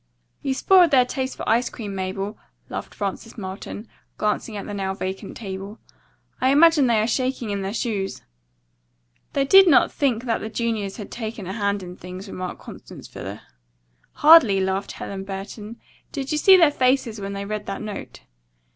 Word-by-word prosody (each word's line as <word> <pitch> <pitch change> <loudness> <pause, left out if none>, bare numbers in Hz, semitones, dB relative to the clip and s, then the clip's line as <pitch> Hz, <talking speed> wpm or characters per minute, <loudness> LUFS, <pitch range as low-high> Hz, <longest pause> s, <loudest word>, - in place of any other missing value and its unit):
"You 270 -2 -1
spoiled 360 +4 +5
their 260 -4 +5
taste 260 +1 -4
for - - -6
ice 235 +3 +2
cream, 205 -4 -7
Mabel," 195 +2 -3 0.3
laughed - - -6
Frances 205 +3 -5
Marlton, 200 +2 -7 0.3
glancing 210 +1 -1
at 200 - -6
the 205 - -6
now 195 -1 -2
vacant 190 0 -5
table. 195 0 -7 0.6
"I 260 - +4
imagine 300 0 +6
they 230 -2 +3
are - - +1
shaking 255 -1 -1
in 200 -1 -2
their 195 0 -3
shoes." 205 -5 -3 1.1
"They 275 - +1
did 385 +6 +8
not 320 - +5
think 245 -5 0
that 235 -3 0
the 220 - -5
juniors 220 -3 -2
had 210 - -8
taken 220 -3 -5
a 190 - -5
hand 200 -2 -1
in 180 0 -8
things," 185 +3 -9
remarked 185 -2 -6
Constance - - -11
Fuller. - - -8 0.7
"Hardly," 295 -11 +7
laughed 190 +1 -1
Helen 195 -1 -6
Burton. 200 +3 -7 0.3
"Did 275 -1 -4
you 305 - +1
see 380 +3 +8
their 330 -5 +6
faces 255 -5 +1
when 195 0 -4
they 200 0 -4
read 210 0 -4
that 195 +2 -4
note?" 210 -1 -7
215 Hz, 175 wpm, -23 LUFS, 195-255 Hz, 1.1 s, did